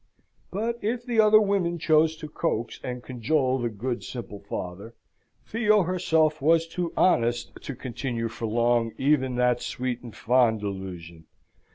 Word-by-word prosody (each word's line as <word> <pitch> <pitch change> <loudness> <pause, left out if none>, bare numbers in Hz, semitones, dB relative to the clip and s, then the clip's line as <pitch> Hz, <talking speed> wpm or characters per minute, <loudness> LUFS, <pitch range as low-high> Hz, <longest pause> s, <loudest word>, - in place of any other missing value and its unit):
But, 230 +5 -2
if 235 +3 -2
the 240 -3 0
other 215 0 +7
women 195 -5 +1
chose 160 0 +3
to 155 -1 -8
coax 150 -7 -2
and 125 -1 -5
cajole 130 +1 0
the 120 -1 -1
good, 120 +3 -4
simple 115 -5 -7
father, 100 +3 -7 0.5
Theo 215 -3 +3
herself 160 -4 +1
was 165 +3 +4
too 170 0 -3
honest 120 -9 +2
to 140 - -6
continue 120 -2 -3
for 115 0 -5
long 115 0 +1
even 130 -2 +2
that 125 0 +2
sweet 125 -4 -3
and 120 -3 -10
fond 120 -2 +3
delusion. 90 -5 -7
130 Hz, 150 wpm, -26 LUFS, 115-165 Hz, 0.5 s, other